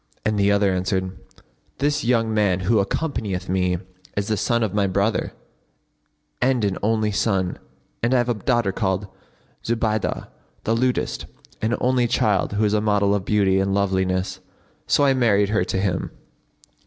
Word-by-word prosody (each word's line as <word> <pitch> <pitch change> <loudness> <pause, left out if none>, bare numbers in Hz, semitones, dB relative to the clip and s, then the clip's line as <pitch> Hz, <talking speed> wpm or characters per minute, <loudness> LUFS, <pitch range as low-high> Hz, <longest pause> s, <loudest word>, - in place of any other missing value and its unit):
and 105 -1 +1
the 100 0 +3
other 100 -1 +3
answered, 95 0 -1 0.7
'This 145 +1 0
young 115 -2 +1
man 100 -4 +2
who 105 +4 +2
accompanieth 100 - -2
me 90 -1 +1 0.4
is 100 0 -1
the 110 - +2
son 115 +3 +1
of 105 -3 -1
my 100 -1 +2
brother 100 +3 0 1.1
and 125 -3 +2
an 100 -2 0
only 110 0 +1
son; 95 -3 0 0.4
and 120 - +1
I - - +5
have 120 -1 +1
a 120 - +2
daughter 115 -1 0
called 95 0 -1 0.6
Zubaydah[FN#53] 110 -2 -1 0.4
the 115 - +1
lutist, 125 +1 -1 0.4
an 115 +2 +1
only 125 -1 +2
child 105 -4 +1
who 105 +1 +1
is 105 - +1
a 105 - +2
model 100 -1 +2
of 100 -2 -1
beauty 100 -3 +2
and 95 0 0
loveliness, 95 -2 0 0.5
so 145 - +3
I 135 -1 +4
married 105 -6 +3
her 105 -4 +2
to 95 - -2
him. 95 -3 -1
105 Hz, 165 wpm, -22 LUFS, 95-115 Hz, 1.1 s, I